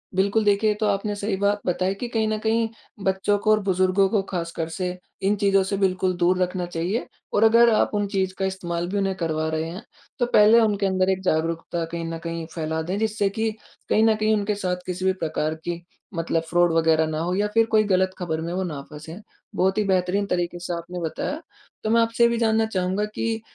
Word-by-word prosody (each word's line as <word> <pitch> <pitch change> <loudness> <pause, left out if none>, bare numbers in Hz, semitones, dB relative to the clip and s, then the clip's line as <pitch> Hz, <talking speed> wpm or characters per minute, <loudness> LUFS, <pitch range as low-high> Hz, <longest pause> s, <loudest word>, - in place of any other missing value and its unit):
बिल्कुल, 200 +3 +2
देखिए, 205 +1 +3
ये 210 - +1
तो 215 - +1
आपने 205 +1 0
सही 205 0 -2
बात 200 +1 +1
बताई 185 +1 0
कि 240 +4 -5
कहीं 220 -2 0
न 215 0 0
कहीं 225 0 +1 0.4
बच्चों 190 +2 +2
को 215 - +2
और 215 - +4
बुजुर्गों 190 0 +3
को 205 -2 +2
ख़ासकर 170 -2 -3
से, 180 +1 -3 0.2
इन 200 +2 +2
चीज़ों 195 -1 +3
से 195 +1 -2
बिल्कुल 185 -1 +1
दूर 180 +1 +3
रखना 180 0 -1
चाहिए। 175 +7 -2 0.3
और 210 - +3
अगर 230 +1 +6
आप - - +2
उन 205 -1 0
चीज़ 190 -2 -1
का 190 - 0
इस्तेमाल 175 -2 -3
भी 200 - -2
उन्हें 195 -1 0
करवा 160 -3 -1
रहे 160 +1 -2
हैं, 185 +7 -8 0.4
तो 245 - +3
पहले 225 -1 +6
उनके 205 -3 +2
अंदर 185 0 +1
एक 190 0 -1
जागरूकता 165 0 -1
कहीं 170 0 -5
न 165 0 -4
कहीं 165 -1 -4
फैला 160 0 -2
दें, 180 +5 -3
जिससे 215 -2 0
कि 220 +2 -1 0.4
कहीं 220 - +4
न 225 -1 +4
कहीं 215 0 +1
उनके 205 0 -1
साथ 180 0 -1
किसी 185 +1 -4
भी 190 - +3
प्रकार 160 -3 -2
की 175 0 -3 0.3
मतलब 165 0 0
फ्रॉड 175 0 +3
वग़ैरह 160 -1 +3
ना 155 0 -3
हो 175 +2 -1
या 205 +1 +1
फिर 225 0 +4
कोई 215 -1 +5
गलत 185 -2 +2
खबर 160 -3 -3
में 165 +1 -4
वो 190 +1 -1
ना 150 -6 -4
फँसे। 160 +3 -9 0.4
बहुत 190 +2 +1
ही 215 - +3
बेहतरीन 185 +2 +1
तरीके 175 -1 -2
से 175 0 -4
आपने 175 +1 -5
बताया। 285 - -3 0.4
तो 215 - -1
मैं 230 +1 +4
आपसे 230 +1 +2
ये 235 - +6
भी 235 - 0
जानना 225 -1 +2
चाहूँगा 190 0 -1
कि, 225 +1 -3
190 Hz, 225 wpm, -24 LUFS, 175-210 Hz, 0.4 s, अगर